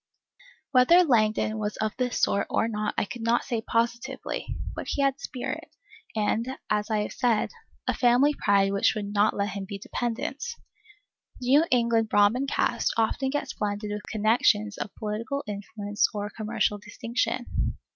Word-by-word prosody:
Whether 285 +8 +6
Langdon 220 -5 +2
was 210 0 -3
of 215 0 -1
this 250 -2 -1
sort 200 - +2
or - - +1
not 210 -2 -2
I - - +2
could 240 +3 -8
not 230 +1 +2
say 235 -4 -2
positively; 235 +4 -2 0.3
but - - -5
he 280 - 0
had 275 0 +1
spirit, 255 -4 -5 0.5
and, 225 +4 0
as 210 0 +1
I 215 -1 +1
have - - -6
said, 235 -4 +1 0.4
a - - +2
family 250 +4 +4
pride 200 -5 +3
which 200 +2 +2
would 205 -1 -4
not 210 +1 +3
let 200 0 0
him 200 -2 -5
be 200 +1 -6
dependent. 240 +6 -3 1.0
The 250 -1 -4
New 290 +5 +6
England 230 -2 +2
Brahmin 220 +7 +3
caste - - +1
often 230 +4 +1
gets 290 +2 -2
blended 205 0 -3
with 210 0 -3
connections 215 -1 +2
of - - -3
political 225 +6 -3
influence 205 +1 -1
or 205 0 -3
commercial 215 -1 0
distinction. 235 +3 -2
220 Hz, 160 wpm, -27 LUFS, 210-245 Hz, 1.0 s, Whether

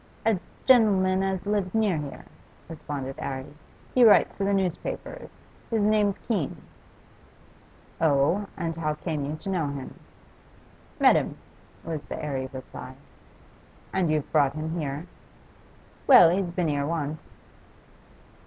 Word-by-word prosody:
'A 220 -4 +3 0.3
gen'leman 195 -7 +4
as 190 -1 -2
lives 205 -2 -1
near 215 -5 +2
here,' 145 -2 -6 0.4
responded 145 -4 -6
'Arry. 130 -1 -4 0.5
'He 250 - +5
writes 220 -3 +6
for 195 - -2
the 200 - +1
newspapers. 195 - -4 0.3
His 225 -3 +1
name's 210 -1 +2
Keene.' 195 - -2 1.4
'Oh? 160 +6 +2
And 165 -1 -3
how 155 -2 -2
came 155 -2 -3
you 150 +2 -3
to 155 +5 -7
know 170 -6 0
him?' 140 -2 -7 1.0
'Met - - +6
him,' - - -2 0.5
was 160 -2 -4
the - - -6
airy 135 -3 -3
reply. 130 -1 -9 1.0
'And 185 -4 +1
you've 155 -2 -1
brought 140 -3 +3
him 155 +1 -4
here?' 150 -2 -3 1.0
'Well, 180 -11 +9
he's 185 0 0
been 170 -2 -1
here 145 -1 -1
once. 155 -2 -4
165 Hz, 130 wpm, -26 LUFS, 145-195 Hz, 1.4 s, Well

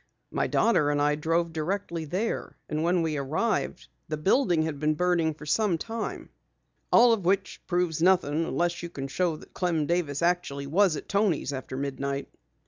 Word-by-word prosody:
My - - 0
daughter 160 -11 +3
and 145 0 +1
I 145 0 +3
drove 165 +2 0
directly 170 0 -2
there, 190 +9 -3
and 155 0 -2
when 175 +1 +2
we 155 -2 -1
arrived 155 +12 -1 0.2
the 155 - -3
building 175 - +2
had 155 -3 -3
been 155 +1 +1
burning 170 -2 +1
for 150 - -11
some 195 +2 +2
time." 225 +6 -5 0.6
"All 235 0 +7
of 210 -4 -1
which 190 +2 0
proves 175 -3 0
nothing 165 -3 +3
unless 175 0 -1
you 170 - -5
can 135 -5 -5
show 170 +3 0
that - - -14
Clem 170 -4 0
Davis 170 -3 -1
actually 170 -5 0
was 175 +4 +3
at - - -7
Toni's 195 -8 +1
after 130 -1 -5
midnight." 140 0 -3
165 Hz, 175 wpm, -27 LUFS, 150-180 Hz, 0.6 s, All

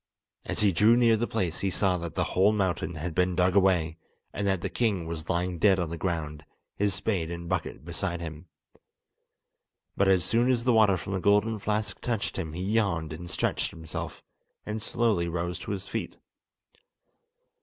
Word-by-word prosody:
As - - 0
he 105 -2 +4
drew 105 +7 +5
near 115 -2 +5
the 120 +2 -1
place 95 -7 -1
he 100 - 0
saw 95 -1 +1
that 85 -2 -6
the - - +1
whole 95 +3 +3
mountain 95 -5 -1
had 80 +2 -4
been 90 +2 +1
dug 90 +1 +2
away, 90 -5 +3 0.4
and 100 - -2
that 95 -3 +1
the 95 - -1
king 100 -4 0
was 80 -1 -6
lying 90 -1 -1
dead 95 0 +5
on 85 -3 -2
the - - -2
ground, 75 -4 -3 0.3
his 100 -1 0
spade 95 -4 -1
and 85 0 -6
bucket 85 -3 -3
beside 85 +1 -3
him. 80 0 -7 1.5
But 100 - +2
as 95 -3 +4
soon 120 +6 +2
as 120 -2 +2
the 125 0 +3
water 105 -4 +5
from 95 - -5
the 95 - 0
golden 105 +3 +2
flask 105 -1 -2
touched 115 -4 -2
him 80 -4 -4
he 90 +2 -4
yawned 95 -7 0
and 85 +2 -8
stretched - - 0
himself, 80 -1 -7 0.4
and 105 +1 -4
slowly 105 -6 +1
rose 85 +1 -3
to 90 - -6
his 95 -1 -4
feet. - - -4
95 Hz, 185 wpm, -28 LUFS, 85-105 Hz, 1.5 s, drew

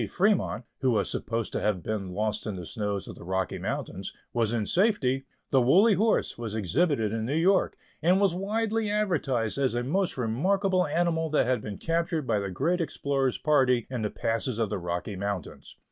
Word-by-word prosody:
Fremont 200 -8 +1 0.2
(who 130 - +2
was 110 -4 +1
supposed 115 -1 -2
to - - -2
have 105 -5 0
been 100 -2 -3
lost 105 +3 -2
in 105 - -3
the 90 -2 -6
snows 105 -1 -3
of - - -7
the - - -12
Rocky 95 +1 -2
Mountains) - - -4 0.2
was 115 -2 +1
in 115 -3 0
safety, 140 - +1 0.3
the 135 - +5
"Woolly 190 - +5
Horse" 215 - +1
was 115 -2 -4
exhibited 110 - +1
in 110 -1 -2
New 130 +6 -1
York, 185 +4 +3 0.2
and 180 +4 +4
was 200 -3 +3
widely 215 +3 -1
advertised 150 - 0
as 130 -3 +1
a 120 - 0
most 180 +7 0
remarkable 185 - +1
animal 165 0 0
that 150 - +2
had 125 -2 +1
been 105 -2 -6
captured 165 -2 -1
by 110 -4 +1
the 100 -1 -3
great 170 - 0
explorer's 140 -5 0
party 130 -6 +3
in 125 -3 -2
the 105 - -1
passes 115 +2 -1
of 115 -3 -1
the 105 - -1
Rocky 90 +4 -3
Mountains. 100 -2 -5
130 Hz, 190 wpm, -27 LUFS, 110-175 Hz, 0.3 s, the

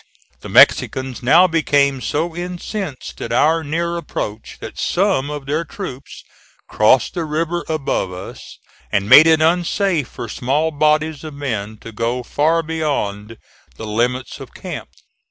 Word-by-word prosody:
The - - -10
Mexicans 130 -1 +4
now 160 +9 +6
became 145 -5 +2
so 160 +5 -2
incensed 180 -2 -6
at - - -5
our 160 +1 +3
near 170 +3 -2
approach 110 -9 -6
that - - -9
some 180 -7 +1
of 145 -2 -6
their 150 +4 -1
troops 165 - -8 0.4
crossed 110 +3 +3
the 170 - -2
river 165 +3 -2
above 140 -11 -1
us, 90 +1 -10 0.3
and 100 -1 0
made 155 +8 +9
it 160 -1 +4
unsafe 175 - +1
for 120 - -7
small 145 +8 -1
bodies 155 0 +1
of 155 -2 -8
men 110 -7 -4
to 115 - -9
go 115 +3 -2
far 160 +6 +1
beyond 115 -10 -3 0.4
the 110 - -7
limits 120 +3 -2
of - - -11
camp. - - -7
150 Hz, 145 wpm, -19 LUFS, 125-165 Hz, 0.4 s, made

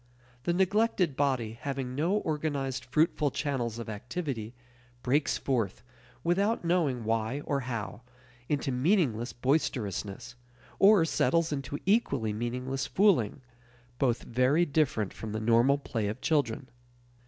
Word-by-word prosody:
The 170 - +2
neglected 190 -4 +2
body, 125 -6 0
having 135 -2 -3
no 160 +8 0
organized 145 -7 -2
fruitful 150 +2 +2
channels 130 -6 -2
of 115 - -6
activity, 120 +1 -5 0.5
breaks 140 +4 +1
forth, 115 -8 -1 0.4
without 195 +4 +1
knowing 160 -9 +1
why 115 +5 -1
or 140 -1 -1
how, 115 -5 -5 0.5
into 145 -2 0
meaningless 125 - +1
boisterousness, 120 - -2 0.5
or 195 -4 +6
settles 165 +2 +1
into 140 0 -3
equally 140 - +1
meaningless 125 +4 -3
fooling 170 - +2 0.6
both 120 -3 +1
very 130 +8 +2
different 140 - 0
from 110 -1 -6
the 110 - -2
normal 115 +5 +4
play 115 -6 -3
of 110 +5 -4
children. 140 -4 0
135 Hz, 120 wpm, -29 LUFS, 115-155 Hz, 0.6 s, or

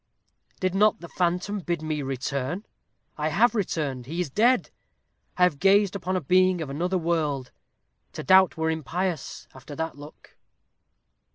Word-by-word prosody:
Did 185 -1 0
not 210 +2 +3
the 170 - -9
phantom 180 +4 -1
bid 170 -3 -3
me 155 -1 -2
return? 135 - -3 0.5
I 150 - 0
have 220 +11 +3
returned 150 - -2
he 165 +5 -4
is 175 -6 -2
dead. 240 - +2 0.7
I 180 - +3
have 175 -6 +3
gazed 195 0 +4
upon 185 -1 -2
a 185 - 0
being 185 +3 +3
of 150 -4 -5
another 175 +6 -1
world. 155 -6 -1 0.6
To - - -6
doubt 190 -2 +5
were 160 0 0
impious, 160 +1 -3
after 130 +2 -11
that 160 -2 -4
look." 145 +1 -14
170 Hz, 155 wpm, -25 LUFS, 150-185 Hz, 0.7 s, doubt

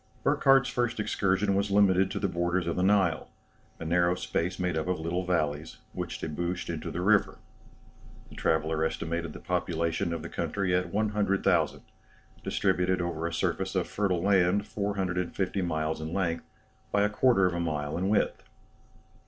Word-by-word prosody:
Burckhardt's 135 -2 +4
first 120 -2 -1
excursion 100 -1 +1
was 100 +1 +1
limited 95 -2 +4
to - - -4
the 100 - 0
borders 85 0 0
of 85 - -1
the 90 - 0
Nile, 95 -4 +2 0.5
a 80 - -6
narrow 85 +2 +2
space 90 +1 -2
made 90 -2 -1
up 80 +2 -2
of 90 -2 -1
little 85 +3 -2
valleys, 80 -3 -1 0.2
which - - -4
debouched 85 +3 -3
into 80 -2 -5
the 90 - -4
river. 105 +2 +3 0.9
The - - -11
traveller 80 0 0
estimated 85 0 -2
the - - -9
population 85 +2 -1
of 85 -2 -4
the - - -5
country 95 -3 -2
at 90 -1 0
100,000, 100 -5 +1 0.6
distributed 90 0 +1
over 85 -1 -2
a - - -4
surface 85 - -1
of - - 0
fertile 95 -4 0
land 95 0 +3
450 95 -1 -2
miles 80 -2 -1
in 80 +1 -5
length, 85 -4 -1 0.5
by 100 - +3
a - - +4
quarter 105 -2 +3
of 90 - +1
a 85 - -2
mile 75 -3 -2
in 95 +3 -1
width. 105 - +1
90 Hz, 165 wpm, -28 LUFS, 85-100 Hz, 0.9 s, Burckhardt's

